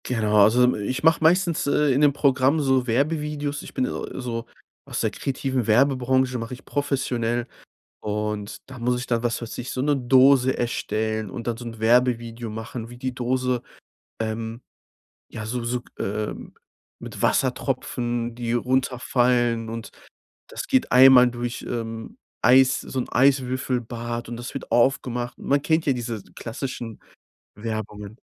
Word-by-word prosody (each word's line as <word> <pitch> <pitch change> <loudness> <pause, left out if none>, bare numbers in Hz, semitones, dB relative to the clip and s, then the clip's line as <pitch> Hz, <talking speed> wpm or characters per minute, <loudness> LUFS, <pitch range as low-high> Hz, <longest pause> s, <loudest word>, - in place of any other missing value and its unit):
Genau, 110 -4 +1
also, 115 +4 +5
hm, 125 - +4
ich 130 +8 -3
mache 160 0 +4
meistens, 170 -1 +3
äh, 145 0 +3
in 135 - +2
dem 145 -1 +6
Programm 140 +1 +3
so 130 -3 +2
Werbevideos 145 +3 -1
ich - - -11
bin, 130 - +1
äh, - - -5
so 115 -2 -4 0.4
aus - - -4
der - - 0
kreativen 130 -3 -2
Werbebranche 130 +1 +2
mache 115 +2 -5
ich 130 - -18
professionell 125 -4 -1 0.5
und 105 0 -3
da 130 -1 -9
muss 125 +1 +1
ich 125 - -5
dann, 120 -1 0
was 120 0 -1
weiß 115 - -6
ich, 125 +1 -5
so 130 - -2
'ne 145 +1 +2
Dose 130 +1 +5
erstellen 110 -2 -2
und 115 +5 -7
dann 115 -1 -1
so 120 - -9
'n 115 -1 -7
Werbevideo 120 0 +2
machen, 115 +1 -6
wie 120 - -11
die 130 0 -3
Dose, 125 0 -1 0.6
ähm, 110 +1 -4 0.7
ja, 110 -1 -7
so 120 +1 -3
so 120 +1 -1
g - - -23
ähm, 105 +2 -4 0.5
mit - - -8
Wassertropfen, 120 -1 -1
die 120 -1 -2
runterfallen 125 -2 +1
und 115 0 -6 0.6
das 390 - -7
geht 260 -2 +2
einmal 125 -1 +8
durch, 120 0 -4
ähm, 115 -1 -5 0.2
Eis 130 +2 +5
so 130 - -3
'n - - -4
Eiswürfelbad, 125 -3 0
und 120 - -5
das 120 +2 -7
wird 135 - -7
aufgemacht. 120 -1 +1
Man 140 +1 +1
kennt 160 +1 +1
ja 140 - +4
diese 115 -4 -4
klassischen 115 -1 -6 0.6
Werbungen. 105 -1 -5
125 Hz, 155 wpm, -24 LUFS, 115-130 Hz, 0.7 s, einmal